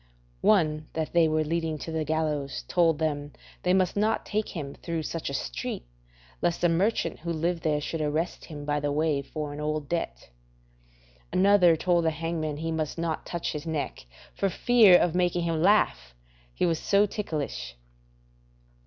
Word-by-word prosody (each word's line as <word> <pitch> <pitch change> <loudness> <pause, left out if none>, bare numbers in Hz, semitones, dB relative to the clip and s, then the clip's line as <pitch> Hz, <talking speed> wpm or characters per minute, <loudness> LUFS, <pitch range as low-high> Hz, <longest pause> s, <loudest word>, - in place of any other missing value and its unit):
One 155 -7 +3
that 160 -1 -3
they 170 -2 +5
were 155 0 +1
leading 160 0 -1
to 165 - -6
the 160 -1 -1
gallows 150 -3 -2
told 165 -3 +3
them 145 -2 -2 0.3
they 180 - +1
must 185 -1 +2
not 215 +2 +1
take 215 0 -2
him 140 -5 -5
through 165 -2 -4
such 165 -1 -4
a - - -5
street, - - -4 0.6
lest 170 - 0
a 175 - +5
merchant 170 0 0
who 170 +1 -4
lived 165 +1 -1
there 150 -2 +1
should 155 +2 -4
arrest 155 +3 -2
him 145 -2 -8
by 150 0 0
the 145 0 -1
way 150 -1 +1
for 150 +1 -5
an 145 - -7
old 150 -1 -2
debt. 150 - -4 1.0
Another 185 -3 +5
told 175 +1 +2
the - - +4
hangman 160 -1 -3
he 165 +1 -3
must 160 -1 -2
not 165 -1 -3
touch 170 -1 -3
his 150 +1 -6
neck 155 - -4 0.3
for 195 - 0
fear 220 -3 +6
of 175 -2 +1
making 175 -1 +1
him 165 -2 0
laugh, 65 - +2 0.4
he - - 0
was 165 -2 +1
so 200 +1 +3
ticklish. 150 - -4
160 Hz, 175 wpm, -27 LUFS, 150-175 Hz, 1.0 s, fear